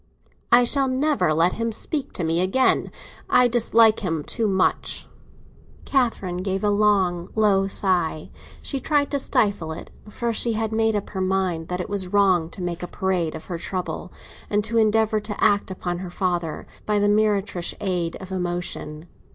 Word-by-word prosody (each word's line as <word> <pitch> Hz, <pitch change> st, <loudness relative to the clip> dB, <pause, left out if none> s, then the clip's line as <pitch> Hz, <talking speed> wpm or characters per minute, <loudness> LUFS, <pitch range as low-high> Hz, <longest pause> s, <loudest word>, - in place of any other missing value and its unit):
"I 245 Hz, +1 st, +7 dB
shall 270 Hz, +3 st, +2 dB
never 260 Hz, -, +1 dB
let 165 Hz, +3 st, +3 dB
him 230 Hz, 0 st, -2 dB
speak 280 Hz, +5 st, -3 dB
to 180 Hz, -, -2 dB
me 165 Hz, +2 st, +1 dB
again. 225 Hz, +8 st, +2 dB, 0.4 s
I 250 Hz, -, +5 dB
dislike 230 Hz, -2 st, +4 dB
him 165 Hz, -6 st, -2 dB
too 225 Hz, +6 st, -1 dB
much." 190 Hz, -2 st, 0 dB, 0.8 s
Catherine 230 Hz, -9 st, 0 dB
gave 190 Hz, +1 st, -2 dB
a 205 Hz, -, +3 dB
long, 195 Hz, -4 st, +2 dB
low 200 Hz, -3 st, +3 dB
sigh; 180 Hz, -5 st, +1 dB, 0.3 s
she 275 Hz, -, -2 dB
tried 290 Hz, +1 st, +1 dB
to 285 Hz, -, 0 dB
stifle 200 Hz, -10 st, +1 dB
it, 160 Hz, -, -8 dB, 0.2 s
for 235 Hz, +2 st, -2 dB
she 230 Hz, +1 st, +1 dB
had 220 Hz, 0 st, -2 dB
made 220 Hz, 0 st, +1 dB
up 205 Hz, -, -3 dB
her 190 Hz, -, -3 dB
mind 185 Hz, -3 st, -1 dB
that 180 Hz, 0 st, -3 dB
it -, -, -5 dB
was 200 Hz, -3 st, -3 dB
wrong 185 Hz, -4 st, +2 dB
to 180 Hz, -, -8 dB
make 175 Hz, -1 st, -4 dB
a 175 Hz, -, -4 dB
parade 180 Hz, -4 st, -1 dB
of -, -, -9 dB
her 175 Hz, -3 st, -5 dB
trouble, 180 Hz, +1 st, -4 dB, 0.4 s
and 205 Hz, 0 st, +1 dB
to 225 Hz, +2 st, 0 dB
endeavour 220 Hz, 0 st, +2 dB
to 210 Hz, -1 st, -6 dB
act 205 Hz, -1 st, +3 dB
upon 175 Hz, -2 st, -4 dB
her 185 Hz, -1 st, -6 dB
father 175 Hz, -3 st, -2 dB, 0.2 s
by 210 Hz, -1 st, +2 dB
the 205 Hz, 0 st, +2 dB
meretricious 205 Hz, -4 st, 0 dB
aid 180 Hz, -4 st, -1 dB
of 190 Hz, 0 st, -10 dB
emotion. 175 Hz, -3 st, -4 dB
195 Hz, 175 wpm, -23 LUFS, 180-220 Hz, 0.8 s, I